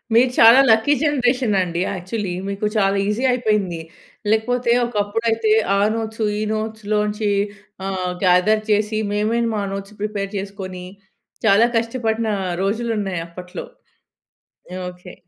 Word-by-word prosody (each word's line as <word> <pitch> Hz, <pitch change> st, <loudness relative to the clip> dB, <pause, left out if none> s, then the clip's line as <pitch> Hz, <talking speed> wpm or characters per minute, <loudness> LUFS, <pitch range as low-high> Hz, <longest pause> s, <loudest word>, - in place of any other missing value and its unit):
మీరు 250 Hz, +2 st, +5 dB
చాలా 230 Hz, +3 st, +8 dB
lucky 220 Hz, +6 st, +4 dB
generation 250 Hz, -6 st, +1 dB
అండి 175 Hz, -1 st, -2 dB
యాక్చువల్లీ 185 Hz, +1 st, -4 dB
మీకు 200 Hz, +1 st, -3 dB
చాలా 195 Hz, -1 st, +2 dB
ఈజీ 210 Hz, +5 st, -1 dB
అయిపోయింది. 210 Hz, -8 st, 0 dB, 0.5 s
లేకపోతే 235 Hz, +2 st, +1 dB
ఒకప్పుడైతే 225 Hz, 0 st, 0 dB, 0.2 s
ఆ -, -, +2 dB, 0.2 s
నోట్సు, 220 Hz, -1 st, -3 dB
ఈ -, -, -2 dB
నోట్స్‌లోంచి 215 Hz, -1 st, -1 dB, 0.6 s
ఆహ్, 185 Hz, -2 st, -2 dB
గ్యాదర్ 185 Hz, +4 st, +4 dB
చేసి, 215 Hz, +1 st, +1 dB
మేమే 215 Hz, +3 st, 0 dB
మా 210 Hz, -, -1 dB
నోట్స్‌ 195 Hz, +1 st, -7 dB
ప్రిపేర్ 205 Hz, -2 st, -2 dB
చేసుకొని, 190 Hz, -2 st, -6 dB, 0.6 s
చాలా 220 Hz, +2 st, +5 dB
కష్టపడిన 230 Hz, -1 st, -1 dB, 0.4 s
రోజులున్నాయి 205 Hz, -4 st, -1 dB
అప్పట్లో 180 Hz, +1 st, -8 dB, 1.1 s
యాహ్! 185 Hz, 0 st, -5 dB
ఓకే. 180 Hz, 0 st, -13 dB
210 Hz, 120 wpm, -20 LUFS, 195-225 Hz, 1.1 s, చాలా